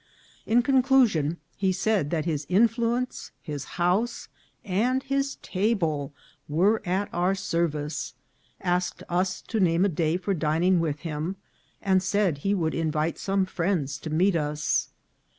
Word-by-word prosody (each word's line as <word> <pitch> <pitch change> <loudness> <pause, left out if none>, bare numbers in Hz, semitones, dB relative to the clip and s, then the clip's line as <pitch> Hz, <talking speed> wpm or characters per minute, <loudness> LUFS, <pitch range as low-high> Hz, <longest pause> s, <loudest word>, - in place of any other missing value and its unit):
In 240 +2 +4
conclusion, 250 - +3 0.2
he 190 -1 +1
said 190 -4 +1
that 160 -2 -1
his 150 -4 -2
influence, 235 +5 +1
his 145 -4 -5
house, 180 +7 0 0.4
and 240 +7 +1
his 275 0 -1
table 175 -8 0 0.4
were 195 +9 +3
at 190 +3 0
our 180 +3 +1
service, 155 -5 -2 0.4
asked 180 -1 -1
us 180 +1 0
to 225 - -2
name 175 0 +3
a - - +2
day 165 0 0
for 190 +2 -1
dining 170 +2 +2
with 150 -3 -2
him, 165 +2 -3 0.5
and 190 -1 +3
said 190 -5 +1
he 195 +7 +1
would 160 -4 0
invite 160 0 -1
some 195 -1 +1
friends 170 -7 -1
to 160 - -6
meet 175 +5 +2
us. 150 -1 0
180 Hz, 140 wpm, -26 LUFS, 160-205 Hz, 0.5 s, In